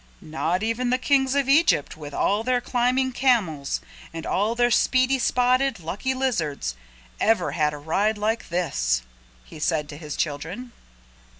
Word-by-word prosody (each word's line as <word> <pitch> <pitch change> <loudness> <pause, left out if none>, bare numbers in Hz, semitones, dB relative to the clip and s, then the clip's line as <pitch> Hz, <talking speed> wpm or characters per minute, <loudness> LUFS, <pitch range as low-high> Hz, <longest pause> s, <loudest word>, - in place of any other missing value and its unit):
"Not 165 +4 -1
even 230 +3 -1
the 255 - +2
Kings 265 0 +2
of 280 -2 +1
Egypt 280 - +3
with 150 -2 -9
all 205 +8 +1
their 250 +1 +1
climbing 250 +2 +1
camels, 185 - +1 0.3
and 165 0 -7
all 210 +4 0
their 240 0 +2
speedy, 255 +2 +3
spotted, 255 -1 +2
lucky 205 +11 -3
lizards, 160 - -1 0.5
ever 205 -9 +2
had 150 -1 +1
a 150 - -7
ride 200 +9 0
like 220 +2 -2
this," 60 - 0 0.4
he 155 - -12
said 155 -1 0
to 145 - -8
his 150 -1 -6
children. 165 - -4
215 Hz, 155 wpm, -24 LUFS, 155-255 Hz, 0.5 s, Egypt